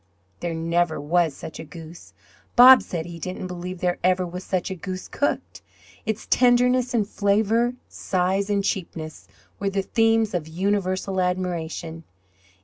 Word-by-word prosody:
There 170 -1 -3
never 165 0 0
was 160 0 +1
such 160 - -9
a - - -5
goose. 165 +2 -12 0.4
Bob 255 +1 +10
said 165 -3 -5
he 170 -1 -8
didn't 185 +3 -5
believe 180 0 -6
there 180 -1 0
ever 185 0 +2
was 180 +1 -7
such 185 0 -2
a - - -3
goose 185 +1 -6
cooked. 285 - -2 0.5
Its 220 0 -2
tenderness 250 0 +3
and 210 -3 +1
flavour, 220 +4 +1
size 190 +2 -1
and 200 -1 +1
cheapness, 160 - -4 0.3
were 200 - 0
the 195 0 -1
themes 225 0 +2
of 170 -4 -2
universal 190 +2 -1
admiration. 170 -3 -3
185 Hz, 145 wpm, -24 LUFS, 170-205 Hz, 0.5 s, Bob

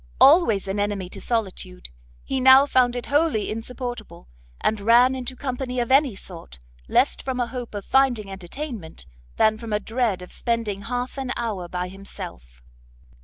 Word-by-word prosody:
Always 270 - +5
an 195 +1 -2
enemy 205 -3 -2
to - - -7
solitude, 185 - -3 0.3
he 265 - -2
now 265 +2 +8
found 250 -3 +3
it 245 - -4
wholly 290 -8 +1
insupportable, 235 - -6 0.3
and 215 -1 0
ran 240 +4 +5
into 255 0 -5
company 255 -1 -3
of 240 +1 -1
any 270 -4 +4
sort, 170 - -11 0.3
less - - +3
from 260 -1 -4
a 245 - +2
hope 240 -2 -7
of 200 - -5
finding 245 -7 +2
entertainment, 195 - -7 0.3
than 220 0 +3
from 230 -1 -7
a 210 - +1
dread 225 -4 -1
of 180 - -12
spending 230 -4 -2
half 245 +5 -4
an 260 -2 -3
hour 210 -7 -3
by 180 +1 -3
himself. 65 - -10
230 Hz, 165 wpm, -24 LUFS, 195-255 Hz, 0.3 s, now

